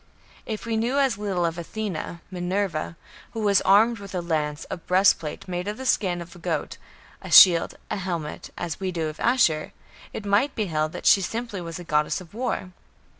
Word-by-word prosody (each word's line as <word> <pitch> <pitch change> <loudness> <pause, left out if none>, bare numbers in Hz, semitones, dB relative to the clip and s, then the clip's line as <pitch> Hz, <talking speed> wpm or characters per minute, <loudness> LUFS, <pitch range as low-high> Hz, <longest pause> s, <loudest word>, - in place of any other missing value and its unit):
If 220 -1 -4
we 225 -1 -1
knew 240 +5 0
as 265 -7 +2
little 190 -4 -1
of 165 0 -2
Athena 170 -2 -5
(Minerva), 180 -2 -2 0.4
who 225 - -4
was 200 -2 +3
armed 220 +4 +4
with 195 -1 -9
a - - 0
lance, 150 -3 -2
a - - -3
breastplate 180 -3 +1
made 180 +1 -4
of 210 +1 -3
the 260 - -7
skin 180 -8 +1
of 170 +1 -15
a - - -13
goat, 165 -3 -3 0.4
a - - -9
shield, 170 -3 +8
and - - -3
helmet, 170 -5 -4
as 165 -3 -4
we 190 -1 -2
do 165 -3 -2
of 155 - -10
Ashur, 195 -11 +2 0.4
it 210 - -7
might 205 +8 +2
be 215 - -1
held 155 -3 -1
that - - -7
she - - +7
was 190 - -2
simply 230 -3 -4
a 170 0 -7
goddess 150 -2 0
of 180 -1 -14
war. 230 -5 -3
185 Hz, 200 wpm, -25 LUFS, 170-210 Hz, 0.4 s, shield